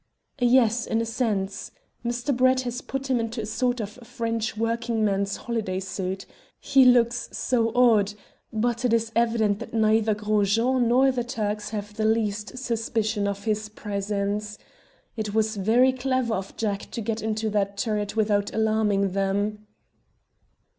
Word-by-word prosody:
"Yes, 240 -2 +3
in 225 - +1
a 230 - 0
sense. 215 -5 -2 0.3
Mr. 240 +3 -1
Talbot 255 +1 +4
has 245 0 -4
put 270 0 -4
him 255 -2 +2
into 230 +1 -3
a 215 - -3
sort 245 +3 0
of 210 -2 -4
French 230 -1 -3
working 230 0 0
man's 200 -1 0
holiday 215 -6 -3
suit. 190 0 -4 0.3
He 270 -2 +4
looks 240 -1 +4
so 230 -3 0
odd, 215 -5 +4 0.4
but 235 +2 -1
it 245 -2 +2
is 225 -1 +1
evident 225 -3 +2
that 235 - -7
neither 220 0 +3
Gros 210 -1 +1
Jean 245 +1 +2
nor 260 +3 +4
the 250 -2 -2
Turks 210 -3 -3
have 210 -1 -5
the 215 +1 -2
least 215 +1 0
suspicion 225 -4 -1
of 200 0 -3
his 215 -1 -1
presence. 205 0 -3 0.6
It 215 -2 -4
was 220 0 +1
very 235 +7 +4
clever 255 -2 0
of 195 -1 -5
Jack 205 -3 -2
to 230 - -5
get 225 +1 -2
into 220 0 -1
that 200 -1 0
turret 210 -1 -2
without 205 -2 +1
alarming 215 -3 +2
them." 205 +2 -1
220 Hz, 155 wpm, -25 LUFS, 210-235 Hz, 0.6 s, Talbot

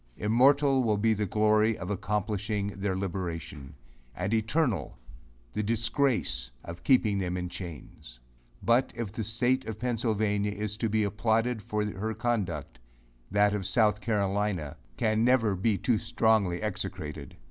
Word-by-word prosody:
Immortal 135 +5 +4
will 110 -4 +1
be 110 +2 +3
the 105 -1 -1
glory 110 +2 +3
of 95 +1 -5
accomplishing 105 0 -1
their 100 -1 -2
liberation; 85 -7 -5 0.4
and 95 +4 -2
eternal 110 - 0 0.6
the - - -1
disgrace 115 - 0 0.2
of 85 0 -8
keeping 110 -7 +3
them 90 -1 -2
in 90 0 -3
chains. 80 -8 -9 0.4
But, 120 +6 +3
if 115 -4 -4
the 110 +1 -4
state 120 +5 +1
of 110 - -5
Pennsylvania 110 -4 0
is 105 0 -3
to 115 0 -1
be 110 0 +2
applauded 110 +3 0
for 105 +1 -2
her 105 +2 -3
conduct, 95 - -2 0.5
that 105 +1 +3
of 100 -3 -2
South 105 -1 +3
Carolina 100 -7 -1 0.2
can 110 0 +2
never 115 -5 +3
be 100 +2 +1
too 110 +3 +1
strongly 110 -6 +1
execrated. 105 -3 -5
105 Hz, 140 wpm, -29 LUFS, 95-115 Hz, 0.6 s, Immortal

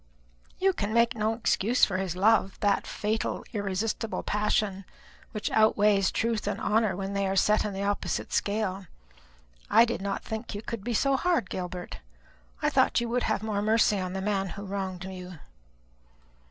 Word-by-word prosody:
"You 385 0 +2
can 215 - -2
make 235 0 +4
no 220 -1 0
excuse 230 +1 +2
for 185 - -2
his 185 -2 -2
love, 195 0 +2
that 205 -1 +1
fatal 215 +1 -2
irresistible 210 +2 -2
passion, 210 -1 0 0.5
which 215 -3 -3
outweighs 210 -2 +4
truth 230 -1 -1
and - - -2
honour 215 -3 +1
when 195 +1 -4
they 200 -1 0
are 190 - -1
set 210 +2 +3
in 210 - -2
the 195 0 -4
opposite 205 0 -2
scale. 200 -2 -1 0.8
I 230 - +7
did 235 -4 -3
not 195 0 -3
think 220 0 -5
you 205 - -5
could 230 -4 -5
be 240 +1 -2
so 275 +4 +2
hard, 340 - 0
Gilbert; 180 -1 -5 0.6
I - - +4
thought - - +3
you 235 0 -2
would 245 +1 0
have 215 -1 0
more 210 -2 -1
mercy 215 -1 +3
on 185 -1 -3
the 190 - -3
man 195 -1 0
who 200 - -6
wronged 190 -2 -4
you." 180 -2 -8
205 Hz, 175 wpm, -28 LUFS, 195-220 Hz, 0.8 s, I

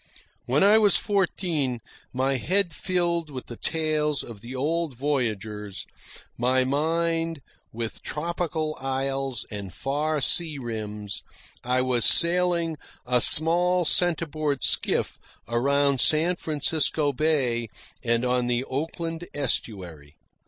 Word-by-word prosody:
When - - +3
I 210 +2 +6
was 205 -2 +4
fourteen, 175 - -1 0.3
my 130 +1 0
head 185 +5 +1
filled 170 -1 -1
with 130 -3 -7
the 120 - -9
tales 155 0 -1
of 110 -4 -10
the 120 +4 -8
old 155 +2 -1
voyagers, 110 -7 -3 0.5
my 130 +2 +2
vision 165 +4 0 0.4
with 115 0 -5
tropic 170 +2 -3
isles 135 -4 -2
and 100 -3 -6
far 150 - -1
sea 155 +2 -1
rims, 105 -4 -6 0.4
I 125 +1 +1
was 125 -3 0
sailing 170 -2 +2 0.3
a 125 0 +2
small 175 +5 +7
centreboard 155 -4 0
skiff - - 0 0.3
around 140 +3 +2
San 165 +3 +3
Francisco 150 -2 -1
Bay 125 -6 0 0.3
and 115 +1 +1
on 125 -1 +1
the 120 +1 0
Oakland 165 +5 -4
Estuary. 90 - -3
145 Hz, 115 wpm, -25 LUFS, 125-165 Hz, 0.5 s, small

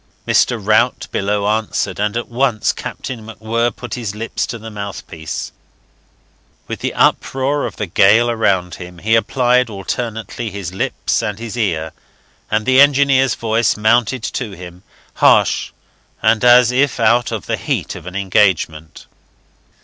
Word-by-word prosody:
Mr. 120 - +3
Rout 110 +4 +2
below 100 +1 -1
answered, 110 -1 -1
and 105 +2 0
at 120 - -4
once 120 -3 0
Captain 120 -4 -7
MacWhirr 115 +1 -2
put 125 - -8
his 110 -5 -4
lips 115 +2 -3
to 115 - -5
the 110 0 -9
mouthpiece. 100 -6 -6 1.2
With - - -5
the - - -3
uproar 135 +2 +1
of - - -9
the 105 - -3
gale 100 +6 +4
around 100 -6 0
him 90 0 -9
he 110 +6 -1
applied 125 +2 +2
alternately 110 +2 -4
his 95 -3 -6
lips 95 - -1
and 105 -1 -3
his 115 0 -7
ear, 80 -9 -1 0.6
and 110 0 0
the 130 +2 +5
engineer's 135 -3 +4
voice 115 0 0
mounted 115 +2 +2
to 115 -3 -4
him, 90 0 -11 0.3
harsh - - +3 0.5
and 115 - +3
as 125 0 +6
if 135 +1 +1
out 115 +1 +3
of 110 -4 -4
the - - -1
heat - - -2
of - - -10
an 90 - -8
engagement. 95 -6 0
110 Hz, 150 wpm, -17 LUFS, 100-120 Hz, 1.2 s, as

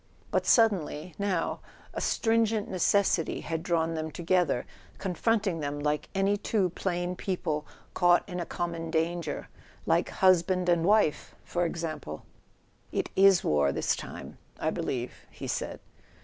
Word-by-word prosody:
But - - +1
suddenly, 185 -7 +2
now, 195 -4 -1 0.3
a - - -4
stringent 225 -2 +1
necessity 185 -2 +1
had 165 0 -3
drawn 165 -1 0
them 160 0 -3
together, 175 -5 +1 0.3
confronting 195 -1 0
them 145 -1 -3
like 150 0 -1
any 195 +1 +2
two 200 -3 0
plain 175 0 -2
people 160 -6 -2 0.3
caught 175 +1 +4
in 180 -2 -4
a 175 - -2
common 170 -1 -3
danger—like 165 -1 -2
hus¬ 185 -3 +4
band 185 -1 0
and 170 -1 +3
wife, 205 -6 +2
for 175 0 -1
example! 155 - -5 0.7
"It - - -2
is 195 -1 +6
war, 75 -2 +2
this - - 0
time, - - -9 0.2
I - - 0
believe," - - -3 0.2
he - - -9
said. - - -3
175 Hz, 135 wpm, -29 LUFS, 160-195 Hz, 0.7 s, is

